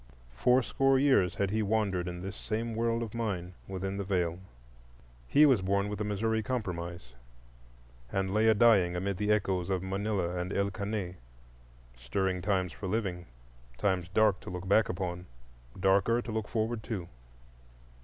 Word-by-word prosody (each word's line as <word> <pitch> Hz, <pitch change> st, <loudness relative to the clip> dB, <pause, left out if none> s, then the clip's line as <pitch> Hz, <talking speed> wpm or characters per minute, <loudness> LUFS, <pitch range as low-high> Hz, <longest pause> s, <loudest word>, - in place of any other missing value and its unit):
Fourscore 130 Hz, -, +3 dB
years 130 Hz, -10 st, +3 dB
had 100 Hz, -1 st, 0 dB
he 110 Hz, +1 st, +1 dB
wandered 100 Hz, -4 st, 0 dB
in 90 Hz, 0 st, -5 dB
this 95 Hz, +1 st, -5 dB
same 115 Hz, +2 st, -3 dB
world 115 Hz, +1 st, 0 dB
of 110 Hz, -, -7 dB
mine, 100 Hz, -6 st, -3 dB
within 95 Hz, +1 st, -4 dB
the 100 Hz, -, -2 dB
Veil. 90 Hz, -3 st, -1 dB, 0.9 s
He 150 Hz, -, +6 dB
was 130 Hz, -8 st, +4 dB
born 100 Hz, +2 st, 0 dB
with 105 Hz, -1 st, -4 dB
the -, -, 0 dB
Missouri 110 Hz, +2 st, 0 dB
Compromise 85 Hz, -, -4 dB, 1.0 s
and 95 Hz, 0 st, -1 dB
lay 110 Hz, +1 st, +3 dB
a 110 Hz, -, +6 dB
dying 100 Hz, -6 st, +5 dB
amid 95 Hz, +1 st, -2 dB
the 105 Hz, +2 st, 0 dB
echoes 95 Hz, -3 st, +1 dB
of 95 Hz, -1 st, 0 dB
Manila 95 Hz, -2 st, -1 dB
and 90 Hz, +1 st, -3 dB
El 100 Hz, 0 st, 0 dB
Caney: 100 Hz, -2 st, -4 dB, 0.8 s
stirring 90 Hz, +10 st, -1 dB
times 95 Hz, -3 st, 0 dB
for 65 Hz, +9 st, -6 dB
living, 95 Hz, -4 st, -2 dB, 0.5 s
times 95 Hz, -4 st, 0 dB
dark 105 Hz, 0 st, +3 dB
to -, -, -9 dB
look 90 Hz, +1 st, -6 dB
back 105 Hz, +3 st, +4 dB
upon, 90 Hz, -1 st, -4 dB, 0.5 s
darker 100 Hz, +5 st, +3 dB
to 120 Hz, -, -5 dB
look 110 Hz, -1 st, -2 dB
forward 115 Hz, 0 st, -1 dB
to. 105 Hz, -6 st, -5 dB
100 Hz, 160 wpm, -30 LUFS, 90-110 Hz, 1.0 s, He